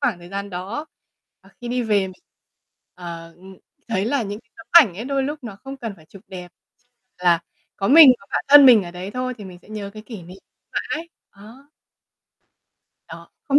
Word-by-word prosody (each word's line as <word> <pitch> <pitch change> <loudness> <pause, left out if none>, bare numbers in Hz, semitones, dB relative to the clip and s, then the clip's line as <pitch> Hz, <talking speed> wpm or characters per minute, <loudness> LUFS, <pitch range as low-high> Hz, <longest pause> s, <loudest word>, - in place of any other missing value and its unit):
khoảng 175 - 0
thời 175 0 -13
gian 200 +1 -5
đó. 195 - -6 0.5
Ờ, 195 - -21
khi 240 - -7
đi 245 0 -1
về 210 -3 +2
mình, 185 - -9 0.8
ờ, 170 -2 -9
ừm, 190 +1 -15 0.3
thấy 195 -4 -1
là 250 +2 0
những 205 +1 -6
cái 230 - -42
tấm 225 - -14
ảnh 275 - +7
ấy 225 - -6
đôi 275 0 -1
lúc 290 -1 -5
nó 200 -4 -8
không 270 +1 -7
cần 230 -5 -6
phải 160 - -19
chụp 195 +2 -15
đẹp, 180 -2 -9 0.7
chỉ 180 - -12
là 170 -1 +4 0.4
có 195 - -1
mình, 295 -2 +9
có 200 - -20
bạn - - -1
thân 285 -1 +9
mình 235 -5 +7
ở 175 - -8
đấy 180 +3 -7
thôi 255 +2 -3
thì 205 - -9
mình 180 -2 -11
sẽ - - -21
nhớ 210 -2 -6
cái 215 - -9
kỷ 215 -5 -10
niệm 180 +3 -13 0.3
mãi. 330 +2 -4 0.2
Ờ. 200 +1 -17 1.6
Đó, - - -11 0.2
không 280 0 +5
205 Hz, 210 wpm, -21 LUFS, 185-255 Hz, 1.6 s, mình